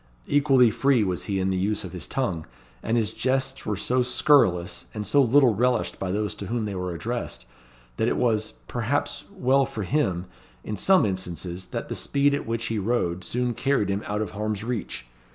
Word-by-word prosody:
Equally 135 Hz, -5 st, +4 dB
free 125 Hz, +1 st, +3 dB
was 90 Hz, -3 st, -2 dB
he 100 Hz, -2 st, -1 dB
in 95 Hz, 0 st, +1 dB
the 95 Hz, -, 0 dB
use 105 Hz, +3 st, 0 dB
of 95 Hz, -, -7 dB
his 90 Hz, -2 st, -6 dB
tongue; 95 Hz, -, -2 dB, 0.3 s
and 115 Hz, +1 st, 0 dB
his 110 Hz, -5 st, 0 dB
jests 135 Hz, +1 st, -1 dB
were 105 Hz, -2 st, -1 dB
so 125 Hz, +5 st, +1 dB
scurrilous 90 Hz, -, +2 dB
and 105 Hz, -1 st, -3 dB
so 145 Hz, -, +4 dB
little 130 Hz, -1 st, +5 dB
relished 125 Hz, +4 st, 0 dB
by 95 Hz, -1 st, -2 dB
those 105 Hz, +1 st, -1 dB
to 100 Hz, -, -7 dB
whom 115 Hz, +1 st, -1 dB
they 105 Hz, -, -3 dB
were 90 Hz, -1 st, -3 dB
addressed, 120 Hz, +8 st, -4 dB, 0.5 s
that -, -, +1 dB
it -, -, +1 dB
was, 110 Hz, -3 st, +1 dB
perhaps, 145 Hz, +4 st, -1 dB
well 135 Hz, -8 st, +3 dB
for 130 Hz, -6 st, -4 dB
him, 95 Hz, -, 0 dB, 0.4 s
in 105 Hz, -, -4 dB
some 190 Hz, -, +4 dB
instances, 90 Hz, -1 st, -4 dB
that -, -, -5 dB
the -, -, -4 dB
speed 140 Hz, 0 st, +2 dB
at 140 Hz, -, -2 dB
which 115 Hz, 0 st, -2 dB
he 110 Hz, -1 st, -1 dB
rode 95 Hz, -5 st, 0 dB
soon 125 Hz, +4 st, -1 dB
carried 115 Hz, -3 st, +1 dB
him 100 Hz, +1 st, 0 dB
out 105 Hz, +1 st, -1 dB
of 100 Hz, -, -6 dB
harm's 105 Hz, 0 st, -3 dB
reach. 115 Hz, -, -4 dB
110 Hz, 200 wpm, -25 LUFS, 95-130 Hz, 0.5 s, little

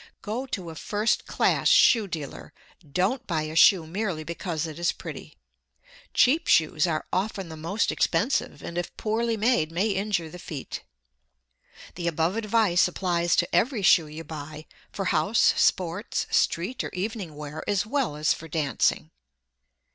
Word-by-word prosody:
Go 235 Hz, +6 st, -3 dB
to 185 Hz, -9 st, -5 dB
a -, -, -10 dB
first 210 Hz, +6 st, -1 dB
class -, -, +1 dB
shoe 225 Hz, -4 st, +5 dB
dealer. 150 Hz, -3 st, -7 dB, 0.4 s
Don't 210 Hz, -, 0 dB
buy 160 Hz, -4 st, -1 dB
a 155 Hz, +1 st, -6 dB
shoe 170 Hz, 0 st, +6 dB
merely 180 Hz, -1 st, -3 dB
because 170 Hz, 0 st, -4 dB
it 160 Hz, 0 st, -7 dB
is 175 Hz, -, +2 dB
pretty. -, -, -9 dB, 0.7 s
Cheap 300 Hz, +6 st, +3 dB
shoes 160 Hz, 0 st, +3 dB
are 155 Hz, -2 st, -2 dB
often 190 Hz, -1 st, -2 dB
the 160 Hz, -, -7 dB
most 165 Hz, +7 st, -1 dB
expensive, 205 Hz, -, 0 dB
and 170 Hz, +1 st, -4 dB
if 175 Hz, -, -6 dB
poorly 225 Hz, +1 st, -1 dB
made 215 Hz, -8 st, +2 dB
may 190 Hz, +6 st, 0 dB
injure 195 Hz, -4 st, -1 dB
the 180 Hz, +3 st, -10 dB
feet. 150 Hz, -5 st, -7 dB, 1.1 s
The 170 Hz, 0 st, -4 dB
above 165 Hz, +3 st, 0 dB
advice 215 Hz, -5 st, +3 dB
applies 175 Hz, -1 st, 0 dB
to -, -, 0 dB
every 235 Hz, -4 st, +1 dB
shoe 170 Hz, -4 st, +5 dB
you 155 Hz, +2 st, -8 dB
buy, 155 Hz, 0 st, -8 dB, 0.3 s
for 195 Hz, -, -4 dB
house, 185 Hz, +5 st, +3 dB
sports, 185 Hz, +3 st, 0 dB
street 190 Hz, +10 st, +1 dB
or -, -, -4 dB
evening 190 Hz, -4 st, -4 dB
wear, 150 Hz, +1 st, -7 dB
as 205 Hz, -1 st, +1 dB
well 250 Hz, -, -1 dB
as 150 Hz, +1 st, +2 dB
for 165 Hz, -, -9 dB
dancing. 140 Hz, -, 0 dB
175 Hz, 155 wpm, -26 LUFS, 160-215 Hz, 1.1 s, shoe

